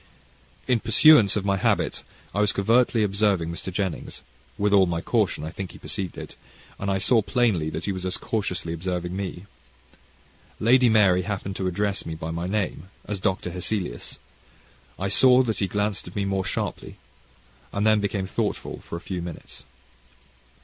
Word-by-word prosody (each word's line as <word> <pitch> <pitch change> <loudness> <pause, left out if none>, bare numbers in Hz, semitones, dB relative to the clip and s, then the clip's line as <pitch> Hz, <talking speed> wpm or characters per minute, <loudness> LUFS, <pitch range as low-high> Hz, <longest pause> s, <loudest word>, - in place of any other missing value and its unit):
In 125 -2 +3
pursuance 115 -1 +6
of 100 -2 -1
my 100 -1 +1
habit, - - 0 0.3
I 100 - +1
was 105 - +2
covertly 115 +2 +3
observing 100 -4 +1
Mr. 85 +2 -5
Jennings, 95 -2 -4 0.3
with 105 0 +1
all 95 -2 +6
my 85 -1 -1
caution 75 - 0
I 80 - -5
think 95 -1 -7
he - - -11
perceived 95 -4 -5
it - - -8 0.4
and 100 - -2
I 95 - +1
saw 110 +4 +4
plainly 105 -9 +1
that - - -5
he 100 - -1
was 95 -1 -5
as 95 +2 0
cautiously 90 -6 -3
observing 90 +1 -3
me. 95 -1 -5 1.1
Lady 125 +2 +5
Mary 100 -5 +4
happening 100 0 -4
to 95 -1 -3
address 100 +2 -1
me 80 - -5
by 80 +1 -5
my 85 +2 -3
name, 95 -3 -2 0.2
as 105 -2 -4
Dr. 95 -1 -1
Hesselius, 90 - -3 0.8
I 95 - -2
saw 125 +5 +6
that 110 -3 -2
he 100 - 0
glanced 105 0 -2
at 90 - -11
me 100 -1 -1
more 95 -1 -1
sharply, - - -4 0.8
and 100 +1 -1
then 110 -1 +4
became 100 -1 -1
thoughtful 95 - -3
for - - -8
a 85 - -6
few 90 -1 -5
minutes. 85 -2 -9
100 Hz, 175 wpm, -25 LUFS, 90-105 Hz, 1.1 s, pursuance